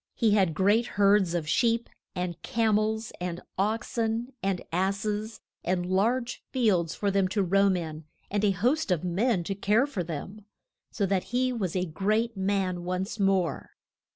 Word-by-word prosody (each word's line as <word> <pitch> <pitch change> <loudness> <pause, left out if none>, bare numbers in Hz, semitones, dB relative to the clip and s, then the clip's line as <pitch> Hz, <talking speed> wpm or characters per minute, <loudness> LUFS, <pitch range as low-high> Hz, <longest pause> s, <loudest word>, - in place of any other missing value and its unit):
He 225 -3 +3
had 190 -6 +3
great 205 +7 +3
herds 200 -3 +4
of 165 -3 -2
sheep, 230 +6 +2 0.3
and 180 -2 -3
cam 220 -2 +2
els, 220 +1 -2
and 175 -1 -3 0.2
ox 220 +5 -1
en 230 +3 -1
and 190 -1 0
ass 195 +4 0
es, 215 +1 -3 0.2
and 180 0 0
large 235 +7 0
fields 190 - +1
for 200 -1 0
them 195 -1 +2
to 200 +2 0
roam 195 +1 +3
in, 160 -2 -6 0.3
and 205 +1 0
a 210 - +4
host 240 - +1
of 180 -3 +1
men 185 +2 +1
to 195 - -2
care 210 +6 +2
for 230 -11 -3
them. 175 +6 -6 0.5
So 205 - -1
that 195 -1 0
he 255 +1 0
was 195 -7 -2
a 185 0 +1
great 215 +7 0
man 190 -2 -1
once 185 +4 -3
more. 195 -3 0
195 Hz, 175 wpm, -28 LUFS, 180-220 Hz, 0.5 s, herds